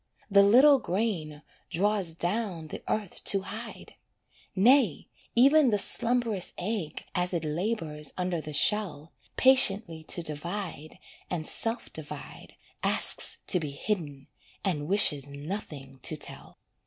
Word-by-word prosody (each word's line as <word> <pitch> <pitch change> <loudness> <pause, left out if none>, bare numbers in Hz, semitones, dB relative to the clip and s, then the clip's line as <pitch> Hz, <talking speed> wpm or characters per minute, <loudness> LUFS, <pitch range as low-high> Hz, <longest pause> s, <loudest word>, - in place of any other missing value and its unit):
The 200 0 +7
little 260 +8 +6
grain 175 -9 -3 0.3
draws 195 -2 0
down 175 -3 -2
the - - -7
earth 210 -4 -2
to 195 -2 +5
hide. 220 +3 -8 0.6
Nay, 230 - +3 0.3
even 275 +3 +5
the 210 - +2
slumberous 230 -2 0
egg, 185 -4 -4
as 180 -1 -1
it 165 -2 -2
labours 155 -3 -3
under 180 -2 -2
the 155 - -8
shell, 165 -1 +2 0.2
Patiently 205 -10 +4
to 170 - -1
divide, 160 0 -5 0.3
and 165 -3 -3
self 230 +7 -3
divide, 155 -2 -9 0.3
Asks - - 0
to 180 - +3
be 155 -3 -4
hidden, 145 -3 -4 0.4
and 150 -6 -1
wishes 160 -8 +4
nothing 140 -3 -7
to 155 - -5
tell. - - -4
180 Hz, 125 wpm, -28 LUFS, 155-215 Hz, 0.6 s, The